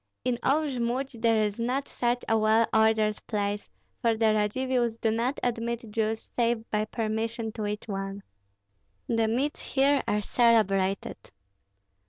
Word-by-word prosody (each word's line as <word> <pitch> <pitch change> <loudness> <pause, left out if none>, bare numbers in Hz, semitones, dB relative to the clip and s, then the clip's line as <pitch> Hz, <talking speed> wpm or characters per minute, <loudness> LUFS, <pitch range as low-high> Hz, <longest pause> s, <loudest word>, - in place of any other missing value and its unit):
In 245 -2 0
all 300 +4 +2
Jmud 255 -2 -2
there 225 -2 +3
is 210 +1 -2
not 255 +4 -1
such 240 0 -1
a 225 - +3
well 220 +1 +4
ordered 220 -1 +3
place, 205 -1 -2 0.3
for 230 -1 +2
the 220 -1 +3
Radzivills 235 +2 0
do 225 - +1
not 235 +5 -1
admit 235 -1 -2
Jews, 220 0 -2
save 235 -1 0
by 215 0 +1
permission 225 +1 -2
to 215 -1 -4
each 210 +1 -4
one. 195 -1 -4 0.8
The 230 -1 +1
meads 260 +7 -1
here 280 +1 +2
are 210 - +1
celebrated." 200 -5 +2
225 Hz, 145 wpm, -27 LUFS, 215-240 Hz, 0.8 s, well